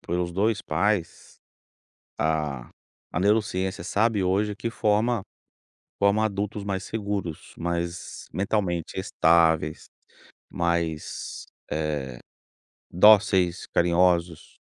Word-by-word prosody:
pelos 85 0 -2
2 105 +3 +1
pais 100 -5 +1 1.1
a 75 -5 -1 0.4
a - - -1
neurociência, 95 -2 +1
sabe, 105 +3 +1
hoje 100 +3 +1
que 115 +1 -3
forma 110 0 +1 0.8
forma 100 +2 +3
adultos 105 0 -3
mais 100 -1 -3
seguros, 100 -7 -4
mais 85 0 -4
mentalmente 95 -4 -1
estáveis, 80 -4 +2 0.6
mais, 85 -2 -2 0.3
eh, 75 -5 -2 0.7
dóceis, 95 -2 +4
carinhosos 85 -1 +1
90 Hz, 85 wpm, -25 LUFS, 85-105 Hz, 1.1 s, dóceis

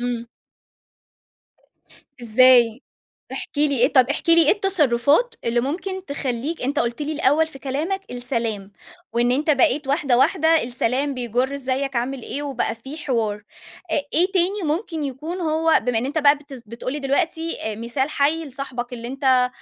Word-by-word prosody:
امم. 240 -1 -3 2.0
إزاي؟ 240 +1 +5 0.5
احكِ - - -6
لي 290 -2 +2
إيه 255 +5 +3
طَب 260 -1 +5
احكِ 320 +3 -2
لي 335 0 +7
إيه - - +7
التصرفات 365 - +2
اللي 235 +1 +1
ممكن 370 +8 -4
تخليك 280 +3 -3
أنت 280 +3 -1
قُلت 235 +4 -2
لي 295 +1 -2
الأوّل 310 +1 +2
في 270 -4 -12
كلامك 310 +9 -2
السلام، 230 -5 -3 0.4
وإن 240 +1 +2
أنت 300 +4 +2
بقيت 275 +1 +2
واحدة، 275 -4 +2
واحدة 320 +2 +3
السلام 250 +3 -1
بيجر 250 +2 -1
إزيّك 270 0 -2
عامل 250 +2 -2
إيه 290 +5 -5
وبقى 260 -5 -2
فيه 265 +7 -10
حوار، 225 -8 -2 0.5
آآ، - - +2 0.2
إيه 360 +4 +2
تاني 380 +2 +1
ممكن 320 0 -2
يكون 305 +7 -5
هو 320 0 +2
بما 245 -2 +1
إن 240 - -1
أنت 290 +4 -3
بقى 290 -1 +5
بت 275 -4 -12
بتقول 235 +4 -6
لي 295 - -3
دلوقتي، 325 +4 -1
آآ، 220 -1 -3
مثال 240 +6 -2
حي 305 +3 +1
لصاحبك 255 -3 -6
اللي 235 0 -6
أنت، 260 -1 +2
275 Hz, 160 wpm, -22 LUFS, 245-310 Hz, 2.0 s, لي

